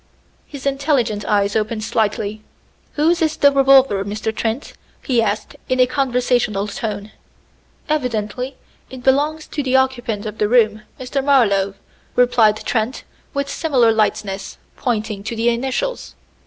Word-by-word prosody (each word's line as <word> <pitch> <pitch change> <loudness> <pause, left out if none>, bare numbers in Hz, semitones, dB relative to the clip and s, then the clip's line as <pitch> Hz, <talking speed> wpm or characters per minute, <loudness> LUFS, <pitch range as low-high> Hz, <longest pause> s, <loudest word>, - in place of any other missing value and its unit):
His 280 -2 -9
intelligent 270 -7 0
eyes 200 -1 +1
opened 215 0 -1
slightly. 215 -1 -1 0.5
"Whose 330 +3 +2
is 315 -1 +1
the 285 - +5
revolver, 270 -7 +5
Mr. 215 +2 -3
Trent?" 225 +5 -3 0.3
he 245 -4 +2
asked 210 -1 -2
in 255 0 +1
a 255 - +7
conversational 245 -5 0
tone. 210 0 -5 0.8
"Evidently 250 -3 -2 0.3
it 255 -1 -10
belongs 295 +4 +2
to 295 - -2
the 265 -1 0
occupant 245 -5 0
of 215 0 -6
the 210 - +1
room, 215 -3 +3 0.2
Mr. 260 +2 -2
Marlowe," 200 -8 +3 0.4
replied 235 -4 +4
Trent 240 +2 -1 0.3
with 280 0 -1
similar 260 -8 +2
lightness, 210 -3 -1 0.2
pointing 220 -4 -2
to 230 +2 -4
the 230 +1 +2
initials. 265 - -2
240 Hz, 135 wpm, -19 LUFS, 215-270 Hz, 0.8 s, a